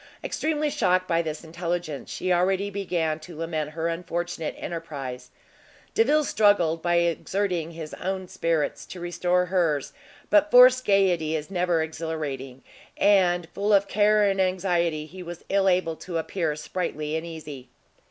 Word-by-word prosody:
Extremely 305 -1 -1
shocked 185 -5 +1
by 165 0 +2
this 155 -1 -5
intelligence, 170 -2 -4
she 185 0 -1
already 190 +3 +1
began 170 -6 -1
to 155 +1 -11
lament 160 -2 -3
her 165 +1 -2
unfortunate 170 -1 -3
enterprise. 145 -7 -6 0.6
Delvile 295 +7 +3
struggled, 205 - +3
by 175 0 +1
exerting 170 0 0
his 165 -2 -8
own 190 0 -4
spirits, 165 -5 -1
to 185 - -9
restore 175 +1 0
hers, 165 -6 0 0.4
but 310 0 +5
forced 255 -1 +7
gaiety 180 -6 +2
is 155 +4 -5
never 175 -3 +1
exhilarating; 155 -5 -5 0.3
and, 180 -4 +3
full 205 +2 0
of 200 0 +4
care 210 +1 +3
and 195 -1 +2
anxiety, 175 -4 0
he 185 +4 -11
was 175 -1 -9
ill 195 -1 +3
able 180 -3 +1
to 175 -2 -5
appear 165 -1 -2
sprightly 155 -1 -3
and 160 - -2
easy. 150 -6 -9
175 Hz, 145 wpm, -25 LUFS, 160-190 Hz, 0.6 s, forced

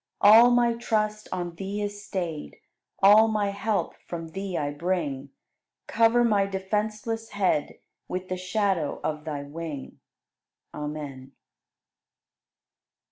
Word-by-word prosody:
All 225 +4 +8
my 240 -1 +3
trust 215 -2 -1
on 175 -2 -3
Thee 195 +4 -5
is 205 0 -4
stayed, 175 -6 -4 0.5
All 210 +3 +8
my 210 -2 0
help 205 +1 -1
from 165 -1 -6
Thee 190 +1 -4
I 145 -1 -1
bring; 145 -4 -2 0.6
Cover 230 +1 +3
my 205 -4 +3
defenseless 215 +3 -2
head 190 -7 0 0.3
With 185 0 -4
the 185 - -2
shadow 185 -4 -1
of 155 0 -3
Thy 145 -3 -4
wing! 150 -1 -7 0.7
Amen. 145 -3 -6
190 Hz, 115 wpm, -26 LUFS, 160-215 Hz, 0.7 s, All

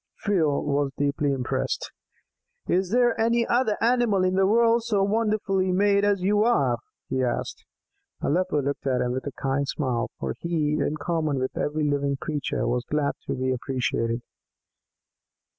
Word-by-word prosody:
Phil 165 -9 +2
was 145 -1 0
deeply 145 0 0
impressed. 130 -2 -2 0.8
"Is 185 +1 +1
there 240 +1 +3
any 235 +1 +2
other 240 -3 +1
animal 230 -5 +3
in 185 0 +2
the 190 0 +3
world 230 +2 +4
so 205 -4 +1
wonderfully 200 -3 +1
made 200 +2 +3
as 200 -3 +2
you 205 +2 +3
are?" 140 - +2 0.3
he 130 - -1
asked. 125 - -3 0.6
Aleppo 170 -2 0
looked 140 0 -3
at 130 -2 +1
him 125 - 0
with 130 +3 -3
a - - -3
kind 135 +1 0
smile, 125 -5 -1
for - - -2
he, 160 -3 0
in 145 +2 -1
common 155 -2 -1
with 130 0 -2
every 150 +1 -1
living 140 -1 0
creature, 150 -3 -2
was 125 0 0
glad 150 -1 +1 0.2
to - - -1
be 130 0 -1
appreciated. 125 -2 -2
155 Hz, 160 wpm, -25 LUFS, 140-205 Hz, 0.8 s, world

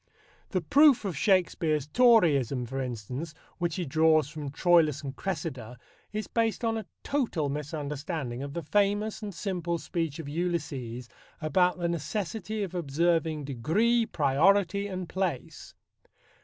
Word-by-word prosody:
The 185 - 0
proof 275 - +5
of 185 -5 -2
Shakespeare's 165 -4 +2
Toryism, 150 - +4
for 135 +3 -4
instance, 130 +6 -5 0.2
which 170 -2 -1
he 180 - -2
draws 155 0 +3
from 150 -2 -6
Troilus 155 -1 +3
and 135 -1 -5
Cressida, 130 - -4 0.3
is 215 0 -3
based 230 0 0
on 225 0 +1
a 220 -3 -5 0.2
total 225 - -1
misunderstanding 145 -2 -4
of 140 0 -6
the 170 - -3
famous 205 +7 +1
and 210 -1 -5
simple 175 -2 -2
speech 165 -3 -3
of 160 -3 -7
Ulysses 145 -7 -3 0.3
about 180 +3 +2
the 175 -1 -1
necessity 205 +6 -3
of 185 -2 -5
observing 160 -1 0
"degree, 210 - +1
priority 185 +7 +2
and 185 -2 -5
place." 180 -7 -4
165 Hz, 135 wpm, -28 LUFS, 145-195 Hz, 0.3 s, proof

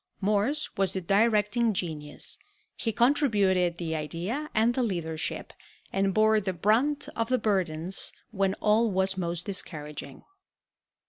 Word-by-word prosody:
Morse 210 +9 +1
was 195 -2 +1
the 190 - -2
directing 210 +4 +2
genius; 155 -5 -4 0.4
he 225 - -1
contributed 205 - +3
the 165 -2 -3
idea 175 - -3
and 225 +2 +4
the 255 - 0
leadership, 160 - -3 0.4
and 195 0 +2
bore 215 +1 +4
the 190 -1 -2
brunt 230 - +2
of 230 0 -1
the 255 - +3
burdens 185 -5 -1 0.2
when 195 -2 +1
all 220 +2 +3
was 190 0 +1
most 175 -1 -3
discouraging. 150 -8 -5
195 Hz, 130 wpm, -28 LUFS, 175-225 Hz, 0.4 s, and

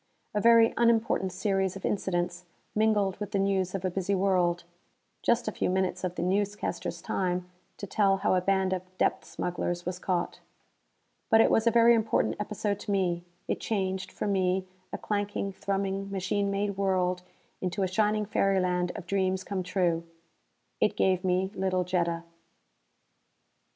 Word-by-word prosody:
A 210 - 0
very 230 0 +6
unimportant 225 -5 +2
series 190 0 0
of 195 - -6
incidents 175 -2 -1 0.3
mingled 210 -3 +2
with 210 0 -5
the - - +2
news 195 -1 +1
of 190 -1 -3
a 185 - 0
busy 195 +2 0
world 180 -3 +2 0.6
just 235 0 +1
a - - 0
few - - -1
minutes 185 0 0
of 180 -1 -2
the - - -2
newscasters' 205 +3 -2
time 180 -1 -1 0.3
to - - -5
tell 195 0 +2
how 195 - +1
a 185 - +3
band 190 0 +1
of 185 - -1 0.2
depth - - +1
smugglers 175 0 -3
was 180 0 -3
caught. 180 -2 -2 0.9
But 225 - +6
it - - +5
was 225 +1 +3
a - - +8
very 235 0 +6
important 225 -1 +1
episode 210 -1 -2
to 205 - -4
me. 180 -3 0 0.2
It - - -1
changed, 190 -3 -2
for - - -4
me, 190 -2 +1 0.3
a - - -3
clanking, 205 -1 -2
thrumming 195 0 -2
machine 200 +1 -1
made 200 0 -1
world 185 -2 +1 0.4
into 185 +1 -1
a - - +2
shining 210 +3 +1
fairyland 185 -3 +1
of 190 - -7
dreams 190 0 0
come 195 -1 -3
true. 180 -2 0 0.8
It - - +1
gave 185 -1 +2
me 185 +1 +1
little 185 -1 0
Jetta. 170 -2 -1
190 Hz, 160 wpm, -28 LUFS, 180-205 Hz, 0.9 s, a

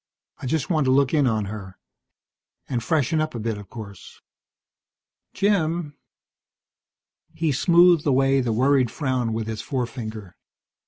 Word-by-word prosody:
I - - -6
just 155 +3 -1
want 155 -5 +1
to 130 - +3
look 135 +1 +3
in 145 -4 +3
on 110 -3 0
her. 100 -2 -8 0.9
And 125 -3 -2
freshen 155 +4 +1
up 155 -4 -3
a - - -3
bit, 110 0 -2
of 100 -2 -12
course." 100 -4 -11 1.1
"Jim 170 -6 0 0.7
" - - -48
He 160 -2 0
smoothed 170 +2 +4
away 135 0 +3
the 120 -2 -1
worried 130 +2 +3
frown 130 -5 -1
with 110 0 -2
his 110 -1 -4
forefinger. 115 -6 -5
130 Hz, 145 wpm, -23 LUFS, 110-155 Hz, 1.1 s, smoothed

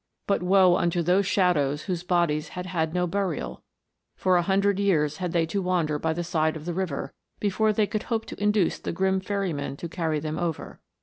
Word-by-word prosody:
But 200 - +1
woe 185 -1 +5
unto 170 -1 +1
those 185 +3 +2
shadows 150 -8 +2
whose 180 -4 -2
bodies 170 -4 +1
had 180 - -3
had 165 -4 -1
no 180 +1 0
burial: 175 - -3 0.5
for 185 -1 +2
a 175 - +4
hundred 195 +2 +2
years 155 -7 +2
had 180 -2 -3
they 165 -1 +2
to 195 +5 -2
wander 170 -5 0
by 160 - 0
the 170 +2 -2
side 160 -2 0
of 155 -1 -8
the 175 - -2
river, 175 -6 -3 0.3
before 215 +2 +2
they 215 0 +2
could 210 +1 -3
hope 225 -2 0
to - - -9
induce 210 -4 +2
the - - -4
grim 190 +2 +1
ferryman 185 -8 -3
to 170 - -5
carry 160 -3 -1
them 155 +1 -4
over. 170 -3 -4
180 Hz, 205 wpm, -26 LUFS, 160-190 Hz, 0.5 s, woe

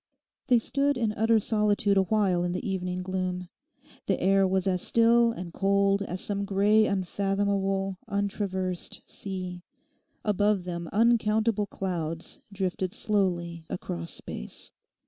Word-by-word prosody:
They 250 - +5
stood 280 +4 +1
in 225 -3 +1
utter 225 +1 +3
solitude 210 -1 +2
awhile 190 -2 +2
in 175 0 -1
the 185 +5 -3
evening 180 -1 -2
gloom. 185 -1 -3 0.6
The - - +1
air 195 +1 +4
was 190 0 0
as 185 -2 +1
still 230 0 +4
and 180 -6 -7
cold 200 0 +2
as 185 -2 -3
some 200 -1 -1
grey 205 +2 +3
unfathomable 195 0 0
untraversed 195 -3 -2
sea. 185 -2 -6 0.6
Above 205 -2 +2
them 170 -1 -5
uncountable 220 -1 +2
clouds 165 -5 -4
drifted 190 0 -2
slowly 175 -6 0
across 85 - -3
space. - - -4
195 Hz, 125 wpm, -27 LUFS, 180-210 Hz, 0.6 s, They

